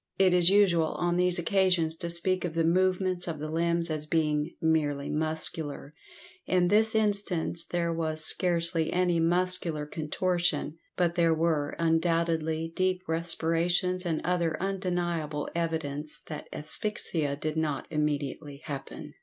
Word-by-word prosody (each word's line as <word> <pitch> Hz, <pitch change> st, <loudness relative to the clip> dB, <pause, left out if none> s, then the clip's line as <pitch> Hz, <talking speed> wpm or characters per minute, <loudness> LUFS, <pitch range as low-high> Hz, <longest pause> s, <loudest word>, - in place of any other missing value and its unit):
It 190 Hz, -2 st, +4 dB
is 175 Hz, -1 st, +6 dB
usual 180 Hz, -5 st, +3 dB
on 175 Hz, 0 st, 0 dB
these 180 Hz, 0 st, +3 dB
occasions 175 Hz, -2 st, +2 dB
to 170 Hz, 0 st, -4 dB
speak 180 Hz, +2 st, +1 dB
of 170 Hz, -2 st, -4 dB
the 165 Hz, -, +2 dB
movements 185 Hz, +1 st, +1 dB
of 165 Hz, -2 st, -3 dB
the 155 Hz, +1 st, -5 dB
limbs 170 Hz, 0 st, 0 dB
as 155 Hz, -1 st, -2 dB
being 150 Hz, -1 st, +1 dB
"merely 150 Hz, -3 st, 0 dB
muscular," 155 Hz, -2 st, -2 dB, 0.5 s
in 180 Hz, -1 st, +2 dB
this 220 Hz, +3 st, +4 dB
instance 200 Hz, -6 st, 0 dB
there 170 Hz, -1 st, -1 dB
was 160 Hz, -1 st, 0 dB
scarcely 170 Hz, -2 st, +2 dB
any 180 Hz, -2 st, +1 dB
muscular 170 Hz, -2 st, 0 dB
contortion, 160 Hz, 0 st, -1 dB, 0.2 s
but 175 Hz, -2 st, +2 dB
there 170 Hz, -2 st, +3 dB
were 155 Hz, -3 st, 0 dB
undoubtedly 165 Hz, -1 st, 0 dB
deep 185 Hz, 0 st, 0 dB
respirations 170 Hz, +2 st, 0 dB
and 165 Hz, -3 st, -1 dB
other 170 Hz, -3 st, 0 dB
undeniable 175 Hz, -6 st, -2 dB
evidence 155 Hz, -3 st, -3 dB
that 150 Hz, -1 st, -8 dB
asphyxia 155 Hz, -3 st, -2 dB
did 155 Hz, +2 st, -4 dB
not 155 Hz, -3 st, -1 dB
immediately 145 Hz, -1 st, -3 dB
happen. 140 Hz, -4 st, -7 dB
165 Hz, 135 wpm, -28 LUFS, 155-180 Hz, 0.5 s, is